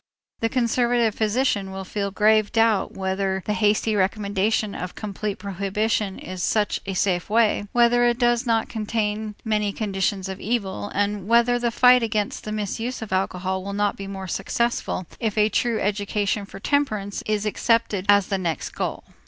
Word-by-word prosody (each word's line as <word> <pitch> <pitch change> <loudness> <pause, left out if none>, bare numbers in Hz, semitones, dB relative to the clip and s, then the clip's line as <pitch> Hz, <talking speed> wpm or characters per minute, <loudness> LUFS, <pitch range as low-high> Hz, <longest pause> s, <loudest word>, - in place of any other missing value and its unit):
The 225 - 0
conservative 240 -2 +2
physician 215 -3 0
will 190 0 -5
feel 200 +1 -3
grave 215 +1 +3
doubt 225 -3 +2
whether 190 0 -2
the 210 - 0
hasty 215 0 +2
recommendation 205 +1 0
of 180 0 -6
complete 210 -1 -4
prohibition 200 +1 -1
is 185 0 -7
such 210 +2 +1
a 195 - -3
safe 180 -1 0
way, 215 -2 +2
whether 240 0 +4
it 240 -1 +2
does 240 0 +2
not 225 -1 +2
contain 215 -1 -2
many 210 -2 +1
conditions 195 -2 -1
of 190 0 -6
evil, 205 -3 -2
and 205 -1 -1
whether 235 +1 +4
the 240 0 +1
fight 250 +2 +6
against 215 -3 -2
the 215 - -4
misuse 225 +4 -3
of 210 - -6
alcohol 185 0 -1
will 200 +1 -5
not 205 0 0
be 195 - -7
more 190 -1 -6
successful 195 +1 -1
if 220 -2 -2
a 210 0 +4
true 235 0 0
education 205 0 -1
for 195 - -10
temperance 215 -6 -1
is 215 -1 0
accepted 210 -2 +1
as 200 -1 +6
the 195 0 -2
next 170 -3 -2
goal. - - -4
210 Hz, 170 wpm, -23 LUFS, 195-225 Hz, -, fight